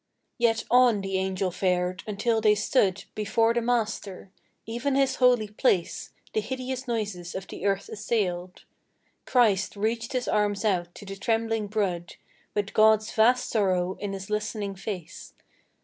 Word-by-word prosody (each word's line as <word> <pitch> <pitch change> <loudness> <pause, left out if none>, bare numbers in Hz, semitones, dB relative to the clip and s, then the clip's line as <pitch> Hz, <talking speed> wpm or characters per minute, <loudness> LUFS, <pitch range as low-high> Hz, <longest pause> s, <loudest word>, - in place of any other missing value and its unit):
Yet 225 -1 +2
on 245 -4 +5
the 195 -1 -1
Angel 190 0 -1
fared, 180 0 0
until 220 +2 0
they 210 -1 +5
stood 205 -2 +1
Before 225 +2 +1
the 235 - +1
Master. 215 -5 -2 0.3
(Even 240 +5 -2
His 270 -1 +2
holy 245 -4 +4
place 200 -5 0 0.2
The 215 - +1
hideous 260 +2 -4
noises 205 -7 -3
of 190 0 -4
the 200 - -4
earth 195 0 0
assailed.) 185 -5 -2 0.6
Christ 215 -7 +3
reached 225 +4 -2
His 255 -1 -1
arms 210 0 +1
out 175 -4 0
to 205 - -10
the 195 0 -6
trembling 225 -1 0
brood, 190 -5 -2 0.4
With 205 -1 -1
God's 215 0 +4
vast 245 +3 +3
sorrow 185 -4 +1
in 205 -1 -4
His 195 +1 -7
listening 210 -1 -2
face. 190 -3 -7
210 Hz, 150 wpm, -26 LUFS, 195-230 Hz, 0.6 s, on